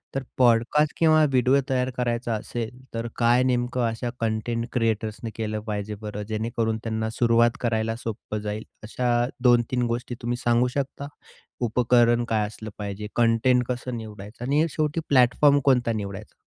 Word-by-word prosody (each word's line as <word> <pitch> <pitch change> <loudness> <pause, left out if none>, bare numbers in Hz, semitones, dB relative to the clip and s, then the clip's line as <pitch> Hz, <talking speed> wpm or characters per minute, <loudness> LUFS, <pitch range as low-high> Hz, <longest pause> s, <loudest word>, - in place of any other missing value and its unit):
तर 135 - -1
पॉडकास्ट 125 +5 +3
किंवा 155 -1 +5
व्हिडिओ 130 +1 +3
तयार 130 -1 +1
करायचा 120 -1 -1
असेल, 110 +1 -4 0.2
तर 115 0 -3
काय 120 +1 +3
नेमकं 125 0 0
अशा 115 +2 -3
कंटेंट 115 +1 -1
क्रिएटर्सनी 110 -1 -1
केलं 110 -1 -3
पाहिजे 105 0 -3
बरं 105 -1 -5
जेणेकरून 110 0 -1
त्यांना 110 -1 -2
सुरुवात 115 +1 +3
करायला 115 -1 0
सोपं 110 -2 -5
जाईल. 105 +1 -4 0.2
अशा 120 +2 0 0.2
दोन-तीन 120 0 +3
गोष्टी 120 +1 -3
तुम्ही 120 +1 -2
सांगू 120 0 +2
शकता? 140 +1 -3 0.6
उपकरण 120 0 +3
काय 110 -2 +1
असलं 110 +1 -9
पाहिजे, 105 0 -5
कंटेंट 120 +2 +3
कसं 125 -1 -3
निवडायचं 105 +1 -9
आणि 145 +4 +2
शेवटी 155 +1 -1
प्लॅटफॉर्म 140 +2 +5
कोणता 125 -4 +3
निवडायचा? 100 -1 -6
120 Hz, 145 wpm, -25 LUFS, 110-125 Hz, 0.6 s, किंवा